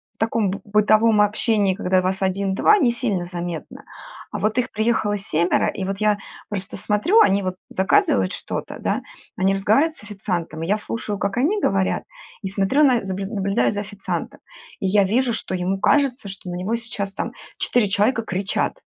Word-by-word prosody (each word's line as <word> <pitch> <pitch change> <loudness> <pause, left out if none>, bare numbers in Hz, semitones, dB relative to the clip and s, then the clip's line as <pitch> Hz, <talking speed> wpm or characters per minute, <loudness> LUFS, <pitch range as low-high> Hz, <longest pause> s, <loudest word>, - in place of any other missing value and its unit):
в - - -38
таком 225 -2 +1
б 200 - -4
бытовом 215 +1 +4
общении, 210 -2 +2
когда 185 -2 +1
вас 185 +1 -1
1-2, 195 - +3
не 260 -11 +3
сильно 230 -7 -1
заметно. 175 -2 -6 0.5
А - - -4
вот 215 +2 0
их 250 0 +1
приехало 220 -1 +1
семеро, 180 +1 +1
и 190 - -4
вот 195 +1 -4
я 210 -1 +3 0.3
просто 195 -2 -4
смотрю, 345 - +3
они 195 +1 +4
вот 185 -1 -3
заказывают 140 - +2
что-то, - - -5
да, - - -1 0.4
они 190 +1 +2
разговаривают 220 +12 +2
с - - -12
официантом, 180 -6 -4
и - - -3
я 205 - +3
слушаю, 210 -1 -4
как 200 +2 -2
они 355 +12 +1
говорят, 195 -1 +1 0.4
и 195 - -4
смотрю 195 +10 +2
на 255 -5 +4
заб 190 -1 -3
наб 195 0 -4
наблюдаю 200 -2 +1
за 205 - -2
официантом. 205 0 -5 0.4
И 195 - +1
я 200 +1 +4
вижу, 240 +5 +1
что 190 - -3
ему 185 +2 -1
кажется, 270 -1 +2
что 190 -1 -8
на 175 - -4
него 195 +6 -1
сейчас 215 -4 -4
там - - -3 0.3
4 245 -4 +2
человека 210 +4 +1
кричат. 190 -2 -1
205 Hz, 185 wpm, -22 LUFS, 190-225 Hz, 0.5 s, бытовом